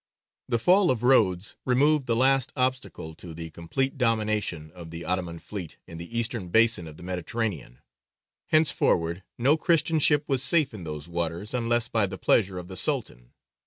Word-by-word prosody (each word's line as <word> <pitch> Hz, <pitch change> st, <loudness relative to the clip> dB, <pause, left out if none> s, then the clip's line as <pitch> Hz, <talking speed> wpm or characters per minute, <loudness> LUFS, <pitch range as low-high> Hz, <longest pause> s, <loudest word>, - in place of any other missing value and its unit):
The 120 Hz, -, +1 dB
fall 180 Hz, -, +4 dB
of 125 Hz, -2 st, 0 dB
Rhodes 105 Hz, -7 st, +2 dB
removed 140 Hz, +2 st, +2 dB
the 115 Hz, -, +1 dB
last 130 Hz, +1 st, +2 dB
obstacle 130 Hz, -, -2 dB
to 80 Hz, 0 st, -10 dB
the 80 Hz, 0 st, -7 dB
complete 135 Hz, -, -3 dB
domination 110 Hz, -, -1 dB
of 85 Hz, -2 st, -11 dB
the 85 Hz, +1 st, -7 dB
Ottoman 90 Hz, -2 st, -2 dB
fleet 90 Hz, -2 st, -8 dB
in 85 Hz, -, -10 dB
the 100 Hz, +8 st, -7 dB
eastern 115 Hz, -4 st, -1 dB
basin 110 Hz, -4 st, +3 dB
of 75 Hz, -1 st, -11 dB
the -, -, -12 dB
Mediterranean. 90 Hz, -, -4 dB, 0.7 s
Henceforward 95 Hz, -, +2 dB, 0.2 s
no 140 Hz, +6 st, +3 dB
Christian 165 Hz, -1 st, +2 dB
ship 150 Hz, 0 st, +4 dB
was 135 Hz, -3 st, +1 dB
safe 140 Hz, -1 st, +3 dB
in 95 Hz, -6 st, -8 dB
those 75 Hz, 0 st, -6 dB
waters 85 Hz, +4 st, -4 dB
unless 120 Hz, -1 st, 0 dB
by 110 Hz, -4 st, +1 dB
the -, -, -7 dB
pleasure 95 Hz, -4 st, +2 dB
of 90 Hz, -1 st, -7 dB
the 95 Hz, 0 st, -5 dB
Sultan. 110 Hz, -, -1 dB
110 Hz, 170 wpm, -26 LUFS, 85-130 Hz, 0.7 s, fall